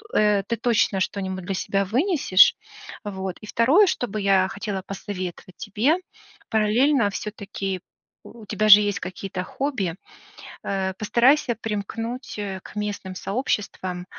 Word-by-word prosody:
э, 210 Hz, -2 st, +3 dB
ты 230 Hz, -, 0 dB
точно 220 Hz, -4 st, +2 dB
что-нибудь 190 Hz, -1 st, -3 dB
для 195 Hz, -, -2 dB
себя 195 Hz, +1 st, 0 dB
вынесешь, 260 Hz, -, +4 dB, 0.5 s
вот. 190 Hz, -2 st, -4 dB
И -, -, -9 dB
второе, 285 Hz, -, +4 dB
что 245 Hz, -, -1 dB
бы 215 Hz, 0 st, -4 dB
я 195 Hz, -1 st, +3 dB
хотела 195 Hz, -1 st, -4 dB
посоветовать 185 Hz, -2 st, -6 dB
тебе- 225 Hz, -, +1 dB, 0.5 s
параллельно 225 Hz, +3 st, +3 dB
всё-таки, 195 Hz, -2 st, -5 dB, 0.4 s
у 230 Hz, -2 st, -13 dB
тебя 215 Hz, +1 st, 0 dB
же 210 Hz, 0 st, +11 dB
есть 205 Hz, -1 st, -1 dB
какие-то 185 Hz, 0 st, -5 dB
хобби, 205 Hz, -, -2 dB, 0.7 s
э, 190 Hz, -1 st, -1 dB
постарайся 240 Hz, +4 st, +3 dB
примкнуть, 225 Hz, +3 st, -4 dB
э, 195 Hz, -2 st, -4 dB
к -, -, -13 dB
местным 205 Hz, -2 st, -4 dB
сообществам, 190 Hz, -4 st, -3 dB
205 Hz, 130 wpm, -24 LUFS, 190-230 Hz, 0.7 s, же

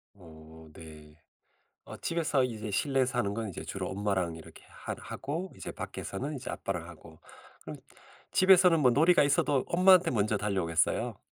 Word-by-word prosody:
어. 80 Hz, -3 st, -15 dB
네. 75 Hz, -2 st, -13 dB, 0.7 s
어 -, -, -10 dB
집에서 155 Hz, -6 st, 0 dB
이제 110 Hz, -3 st, -5 dB
실내에서 130 Hz, +3 st, 0 dB
하는 100 Hz, -3 st, 0 dB
건 115 Hz, -2 st, -4 dB
이제 90 Hz, -, -7 dB
주로 -, -, -5 dB
엄마랑 95 Hz, -4 st, -2 dB
이렇게 80 Hz, -, -14 dB
하 -, -, -7 dB
하고 165 Hz, +7 st, -6 dB
이제 -, -, -7 dB
밖에서는 145 Hz, +3 st, -6 dB
이제 130 Hz, -, -7 dB
아빠랑 90 Hz, -3 st, -5 dB
하고. 80 Hz, -2 st, -14 dB, 0.4 s
그럼 -, -, -8 dB, 0.6 s
집에서는 185 Hz, -2 st, +5 dB
뭐 130 Hz, -, +5 dB
놀이가 160 Hz, +6 st, +4 dB
있어도 140 Hz, -1 st, +1 dB
엄마한테 180 Hz, -1 st, +5 dB
먼저 105 Hz, -2 st, 0 dB
달려오겠어요. 90 Hz, -6 st, -1 dB
110 Hz, 350 characters per minute, -29 LUFS, -, 0.7 s, 집에서는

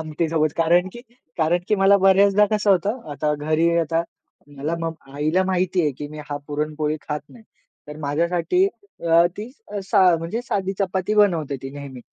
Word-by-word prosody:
आमटीसोबत 155 Hz, -1 st, -1 dB
कारण 175 Hz, +3 st, +3 dB
की 240 Hz, -, -10 dB, 0.4 s
कारण 165 Hz, +3 st, +3 dB
की 210 Hz, -, +3 dB
मला 195 Hz, +1 st, +5 dB
बऱ्याचदा 200 Hz, +2 st, +5 dB
कसं 210 Hz, -1 st, +2 dB
होतं, 200 Hz, +7 st, +1 dB
आता 150 Hz, +1 st, -1 dB
घरी 155 Hz, +3 st, +1 dB
आता 165 Hz, 0 st, 0 dB, 0.5 s
मला 150 Hz, +4 st, -2 dB
मग 165 Hz, 0 st, -3 dB, 0.2 s
आईला 155 Hz, +6 st, +1 dB
माहिती 185 Hz, 0 st, +1 dB
आहे, 150 Hz, -, +1 dB
की 145 Hz, +3 st, -7 dB
मी 155 Hz, -, -10 dB
हा 145 Hz, -, -2 dB
पुरणपोळी 150 Hz, +1 st, -2 dB
खात 150 Hz, -1 st, -4 dB
नाही. 230 Hz, -3 st, -16 dB, 0.4 s
तर 150 Hz, -, -8 dB
माझ्यासाठी 170 Hz, -, +1 dB, 0.4 s
अ, 170 Hz, 0 st, +5 dB
ती 215 Hz, +4 st, -7 dB, 0.3 s
असा 195 Hz, 0 st, +1 dB, 0.2 s
म्हणजे 170 Hz, +9 st, -4 dB
साधी 195 Hz, -5 st, -2 dB
चपाती 190 Hz, +1 st, -1 dB
बनवते 170 Hz, -9 st, +2 dB
ती 135 Hz, -, -6 dB
नेहमी. 140 Hz, -3 st, -9 dB
165 Hz, 170 wpm, -22 LUFS, 150-195 Hz, 0.5 s, मला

